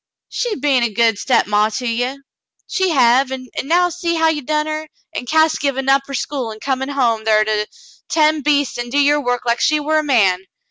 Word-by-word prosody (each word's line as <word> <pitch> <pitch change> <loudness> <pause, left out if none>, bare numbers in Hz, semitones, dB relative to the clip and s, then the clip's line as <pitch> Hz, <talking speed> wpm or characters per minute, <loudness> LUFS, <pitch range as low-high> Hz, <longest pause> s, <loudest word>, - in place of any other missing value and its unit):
She 480 -3 -2
be'n 275 -2 +1
a 235 - +1
good 225 -1 +1
stepmaw 210 -4 +1
to 255 - -5
ye, 245 +4 -2 0.5
she 380 -1 -1
hev, 260 -2 +3
an' 255 -1 -6
now 350 +5 +2
see 340 -1 -2
how 325 0 +3
you 305 -2 -1
done 300 +3 -1
her, 310 0 -5 0.2
an' 250 - -5
Cass 315 +2 +2
givin' 270 -1 -1
up 275 0 +2
her 275 - -5
school 260 -4 -3
an' 215 - -10
comin' 265 +2 -2
home 240 -6 0
thar 215 -1 +3
to 215 0 -1 0.4
ten' 310 -1 +2
beastes 285 -3 0
an' 240 0 -4
do 275 - -2
your 290 +1 +3
work 245 -1 -2
like 235 0 +1
she 305 -1 +2
war 310 +1 +1
a - - -2
man. 195 -10 +2
270 Hz, 215 wpm, -18 LUFS, 235-305 Hz, 0.5 s, hev